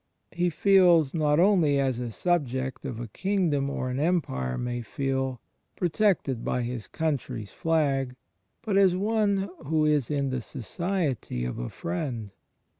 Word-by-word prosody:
He 175 0 +1
feels, 175 -4 +4
not 150 -2 +2
only 175 -7 +4
as 130 -3 0
a 120 -1 -3
subject 130 -2 -1
of 125 -4 -4
a 120 - -5
king 190 - 0
dom 140 -1 0
or 130 -2 -2
an 130 - -2
empire 140 - 0
may 120 0 -3
feel, 135 +1 -2 0.4
protected 175 - +1
by 125 - -1
his 120 -2 -4
coimtry's 140 -9 -3
flag 140 -6 0 0.2
— 95 0 -49
but 205 -3 +1
as 190 -2 +5
one 200 -1 +1 0.2
who 155 0 +2
is 150 -5 +2
in 140 -2 0
the 130 -1 -2
society 140 - -3
of 60 - -4
a - - -3
friend. 110 - -4
140 Hz, 155 wpm, -27 LUFS, 125-175 Hz, 0.4 s, as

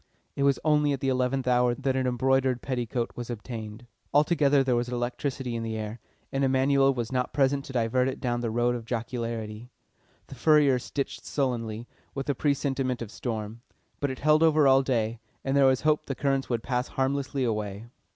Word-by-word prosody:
It - - -3
was 140 -1 +4
only 150 -2 +3
at 135 - -3
the 135 - 0
eleventh 130 0 0
hour 125 -1 +3
that 135 -1 -1
an 130 -1 +1
embroidered 130 0 +1
petticoat 120 -2 -2
was 120 0 -6
obtained. 110 -1 -7 0.3
Altogether 145 -2 +4
there 130 -2 +1
was 120 0 -1
electricity 125 +1 -3
in 115 - -2
the 110 -1 -3
air, 110 +2 -5 0.3
and 135 0 0
Emanuel 135 +1 +3
was 120 -3 -3
not 125 -1 -1
present 140 0 +2
to 135 - -9
divert 125 +1 +1
it 135 - -3
down 120 -1 -1
the 115 - -1
road 120 +2 +1
of 120 -2 -5
jocularity. 115 -1 -4 0.6
The - - -11
furriers 140 -1 +4
stitched 140 +2 -4
sullenly, 120 -5 -2 0.3
with 135 0 -4
a - - 0
presentiment 135 -3 -1
of 110 - -9
storm. 110 -1 -5 0.4
But 140 - 0
it 130 - -4
held 155 +2 +3
over 155 -3 +5
all 135 0 +6
day, 115 -4 -1 0.3
and 135 0 0
there 140 -1 +6
was 130 -1 +3
hope 155 0 +1
the 135 - -3
currents 135 0 0
would 115 -2 -1
pass 125 0 -1
harmlessly 135 0 -1
away. 105 -2 -2
130 Hz, 190 wpm, -27 LUFS, 120-135 Hz, 0.6 s, all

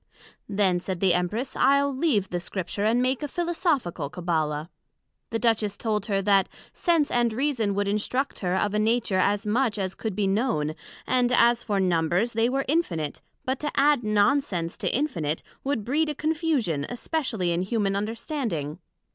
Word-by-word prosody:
Then, 195 -3 +2
said 185 0 -4
the 185 -2 +3
Empress, 205 +9 -2
I'le 280 0 +3
leave 260 - +1
the 175 - -1
Scripture, 190 +2 -4
and 235 +3 +3
make 255 +2 0
a 295 - -2
Philosophical 305 - -1
Cabbala. 155 -2 -2 0.6
The 225 - -1
Duchess 225 -3 +1
told 215 -2 -1
her, 195 -2 0
That, 195 -1 +3 0.2
Sense 335 -5 +1
and 240 -1 +2
Reason 230 -5 0
would 200 0 0
instruct 215 +7 -1
her 180 -1 0
of 205 +2 0
a 210 - +1
Nature 215 -3 +1
as 205 +3 +1
much 220 0 +1
as 190 -2 -2
could 220 -4 -4
be 205 0 +1
known; 195 - 0 0.3
and 250 -1 +2
as 240 -1 +4
for 205 -4 -1
Numbers, 180 +4 +1
they 225 +1 +2
were 270 +1 -1
infinite; 170 - -1 0.2
but 260 +1 -1
to 300 - -2
add 285 -2 +4
non 215 +7 +3
sense 175 -10 -4
to - - -1
infinite, 170 - -1 0.2
would 270 -7 -1
breed 300 +5 +1
a 300 - -2
confusion, 300 - 0
especially 245 - -2
in 170 +1 0
Humane 195 0 0
Understanding. 210 - -3
215 Hz, 170 wpm, -26 LUFS, 185-260 Hz, 0.6 s, as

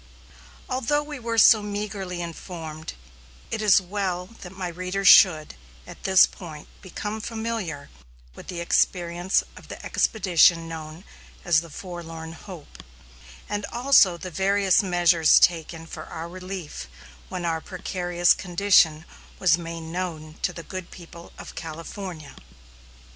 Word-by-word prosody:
Although 265 +3 0
we 295 -2 -8
were 230 -1 -3
so 220 0 +7
meagrely 205 -3 -4
informed, 160 -2 -7 0.6
it 220 - -2
is 210 -3 +6
well 185 -1 -3 0.2
that 180 - -9
my 190 -1 -5
readers 185 +3 -2
should, 160 -8 +7 0.3
at - - -13
this 190 -1 +7
point, 155 -5 -11
become 210 +4 -5
familiar 220 -10 -4 0.4
with - - -13
the 175 -2 -5
experiences 175 +1 +1
of - - -14
the - - -8
expedition 175 -5 +3
known 160 +1 -8 0.4
as 170 -3 +4
the 170 - -12
Forlorn 165 -1 -8
Hope, 170 -2 -12 0.7
and 205 0 -3
also 240 -8 +4
the 185 +1 -8
various 195 +1 +3
measures 175 -4 +4
taken 165 -1 +1
for - - -9
our 165 +1 -6
relief 185 - -7 0.4
when 180 -1 -4
our 165 -1 -1
precarious 175 -1 +1
condition 175 -4 +3 0.3
was 185 -3 +4
made 165 0 -6
known 160 -2 -5
to - - 0
the 170 -1 -9
good 185 -1 -7
people 170 -1 -13
of - - -10
California. 165 0 -8
180 Hz, 130 wpm, -24 LUFS, 165-195 Hz, 0.7 s, so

